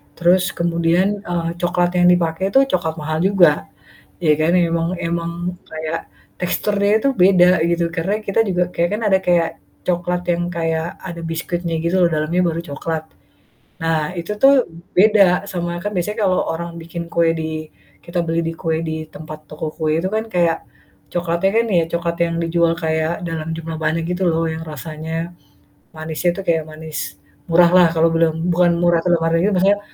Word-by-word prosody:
terus 180 +1 +3
kemudian, 170 +4 +1
eee, 170 -1 -1
coklat 175 0 +1
yang 175 - +5
dipakai 175 0 +2
itu 270 - +5
coklat 160 -3 0
mahal 155 +1 -2
juga, 175 -7 +3 0.6
ya 155 -2 +4
kan 165 +2 +2
emang 165 -1 +1
emang 170 0 -2 0.4
kayak 160 +1 -3 0.4
teksturnya 200 +3 0
itu 275 - +1
beda 180 -1 +6 0.2
gitu 170 0 +1
karena 185 +5 0
kita 200 +3 +1
juga 180 -1 +1
kayak 170 +1 +1
kan 215 - -1
ada 190 -1 +4
kayak 170 -2 +3 0.4
coklat 180 0 -1
yang 175 0 -1
kayak 165 0 -1 0.2
ada 170 -2 -6
biskuitnya 165 +1 -3
gitu 175 +3 +1
loh - - +4
dalamnya 155 +4 0
baru 165 0 -2
coklat. 160 +3 -3 0.8
Nah 165 -1 +2 0.2
itu 170 +5 -5
tuh 275 +1 +7 0.4
beda 210 +1 +6 0.3
sama 175 -1 -3
kan 205 - -2
biasanya 210 +5 -2
kalau 185 -2 +2
orang 170 +1 -4
bikin 170 +1 -6
kue 170 -1 +2
di 155 0 -4 0.4
kita 175 +1 -2
beli 165 +1 0
di 165 - -2
kue 160 -1 0
di 160 - -2 0.2
tempat 155 0 -9
toko 155 +1 -6
kue 155 -1 0
itu 185 - -1
kan 220 - 0
kayak 170 -2 +2 0.5
coklatnya 175 +2 0
kan 230 - +2
ya 165 - +4
coklat 170 0 -1
yang 170 0 -3
dijual 165 0 +2
kayak 160 +1 0
dalam 160 -1 -4
jumlah 165 0 -5
banyak 165 +1 0
gitu 180 +1 -2
loh, 165 +1 0
yang 160 0 -6
rasanya 155 +2 -7 0.8
manisnya 160 +2 -2
tuh - - -4
kayak 160 -2 +2
manis 155 -1 -7 0.5
murah 170 +1 +6
lah 180 -2 +7
kalau 165 +1 +4
belum 165 -1 +3 0.2
bukan 175 0 +4
murah 175 -1 +3
kedam 175 -2 +2
ariu 165 +5 +2
maksudnya 200 +3 +3
170 Hz, 170 wpm, -19 LUFS, 160-180 Hz, 0.8 s, tuh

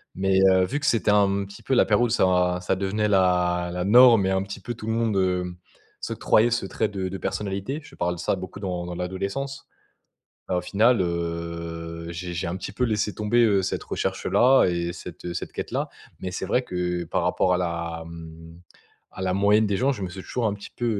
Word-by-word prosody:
Mais, 95 0 +2
heu, 95 0 +4
vu 140 +10 -2
que 150 - -4
c'était 110 -3 +2
un 100 -1 +3
petit 100 0 -13
peu - - -1
la 125 - +5
période 110 +3 +3
où - - -6
ça 90 -4 +2
ça 90 +1 0
devenait 100 +3 -1
la 90 -3 +2
la 90 0 -2
norme 115 -1 +7
et 95 - +1
un 95 0 +1
petit 100 +1 -7
peu 120 +5 -5
tout 110 -2 -9
le 110 - 0
monde, 115 -2 0
heu, 90 -1 0 0.5
s'octroyait 115 +3 +2
ce 120 -3 0
trait - - -1
de 95 -2 -3
de 95 - -5
personnalité, 100 +9 -3
je 165 - -15
parle 90 0 -1
de - - -11
ça 90 - 0
beaucoup 95 +1 -8
dans 90 -3 -3
dans 90 0 -6
l'adolescence. 100 +10 -4 0.8
Bah 90 - 0
au - - +1
final, 110 +6 +3
heu, 85 -1 -4
j'ai 90 +1 -5
j'ai 85 - -2
un 85 - -3
petit 95 +1 -6
peu 125 +5 0
laissé 105 -3 0
tomber, 105 +3 +1
heu, 100 -3 +3
cette 95 - -3
recherche-là 130 +2 +2
et 85 -1 -1
cette, 85 - -10
heu, 85 0 -4
cette - - -5
quête-là. - - -3 0.3
Mais 95 - -4
c'est 90 - -4
vrai 125 +6 +1
que, 90 -5 -2
par 80 - -1
rapport 90 - +2
à - - +3
la, 85 -1 -3
hem, 80 0 -11 0.5
à - - -7
la 95 -1 0
moyenne 105 +2 +4
des 100 - 0
gens, 135 +6 +2
je 110 -7 -6
me 95 - -2
suis 95 +2 -8
toujours 120 +3 -2
un 105 - 0
petit 100 - -10
peu, 120 - -2
95 Hz, 225 wpm, -25 LUFS, 90-105 Hz, 0.8 s, norme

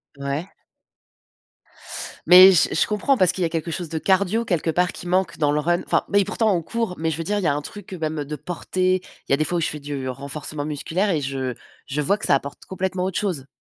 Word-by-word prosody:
Ouais. 140 +5 -3 1.8
Mais 185 +2 +10
je 170 - +3
je - - +4
comprends 210 +6 +1
parce 185 -3 +4
qu'il 185 - -6
y - - +3
a - - 0
quelque 165 0 -3
chose 175 0 -3
de 160 - -4
cardio 200 +6 +2
quelque 170 -6 -1
part 180 +2 +1
qui 175 - -9
manque 180 -1 0
dans 145 -2 +2
le 150 - +1
run. 175 +3 +1
Enfin - - +2
beh 200 - +4
et 195 - +2
pourtant, 220 0 +1
on 170 - 0
court. 225 +1 -3
Mais 160 +1 -1
je 160 - -2
veux 165 - -3
dire, 205 +4 -1
il - - -4
y 165 - +2
a 140 - +2
un 145 - -2
truc, 205 +5 -9
heu, 185 - -5
même, 155 -1 -2
heu, 145 - -3
de 150 +1 -5
porter. 185 +4 -1 0.3
Il - - -3
y - - +5
a 140 - +4
des 155 - +1
fois 175 +3 0
où - - -2
je - - +1
fais 150 - -5
du 140 -2 -5
renforcement 145 +2 -5
musculaire 160 +7 -1
et 160 -5 +1
je 130 -2 -3 0.3
je 150 +3 -2
vois 200 +8 +2
que - - -4
ça - - +4
apporte 140 +1 -5
complètement 185 0 -2
autre 190 -1 -2
chose. 170 -10 -2
170 Hz, 270 wpm, -23 LUFS, 150-190 Hz, 1.8 s, Mais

